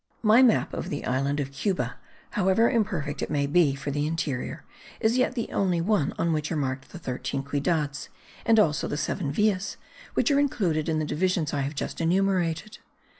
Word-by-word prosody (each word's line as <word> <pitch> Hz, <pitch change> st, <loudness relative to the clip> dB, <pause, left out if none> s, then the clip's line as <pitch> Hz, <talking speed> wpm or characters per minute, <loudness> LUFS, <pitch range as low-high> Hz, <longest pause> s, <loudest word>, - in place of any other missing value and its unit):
My 220 Hz, +3 st, +6 dB
map 245 Hz, -4 st, +4 dB
of -, -, -4 dB
the 145 Hz, -, -4 dB
island 140 Hz, +3 st, 0 dB
of 135 Hz, -1 st, -3 dB
Cuba, 180 Hz, +8 st, -2 dB, 0.3 s
however 200 Hz, +3 st, +3 dB
imperfect 185 Hz, -11 st, -1 dB
it -, -, -2 dB
may 145 Hz, -2 st, +1 dB
be 145 Hz, -1 st, +3 dB
for 140 Hz, +1 st, -4 dB
the 145 Hz, +1 st, 0 dB
interior, 155 Hz, -5 st, -3 dB, 0.4 s
is 220 Hz, +2 st, +2 dB
yet 255 Hz, 0 st, +1 dB
the 235 Hz, -, -3 dB
only 180 Hz, -3 st, +1 dB
one 180 Hz, -4 st, +1 dB
on 165 Hz, -1 st, +1 dB
which 155 Hz, +1 st, -2 dB
are -, -, 0 dB
marked 135 Hz, -1 st, -3 dB
the -, -, -9 dB
thirteen 130 Hz, -3 st, -3 dB
ciudades; 145 Hz, 0 st, -1 dB, 0.3 s
and 225 Hz, -1 st, +4 dB
also 155 Hz, -8 st, +2 dB
seven 150 Hz, 0 st, -2 dB
villas, 205 Hz, +3 st, 0 dB, 0.4 s
which -, -, +2 dB
are 280 Hz, -, +4 dB
included 180 Hz, -, 0 dB
in 160 Hz, -, +1 dB
the 155 Hz, -, 0 dB
divisions 170 Hz, 0 st, 0 dB
I 145 Hz, -, 0 dB
have 140 Hz, +2 st, -3 dB
just 140 Hz, -, -4 dB
enumerated. 185 Hz, +2 st, 0 dB
165 Hz, 185 wpm, -26 LUFS, 145-195 Hz, 0.4 s, My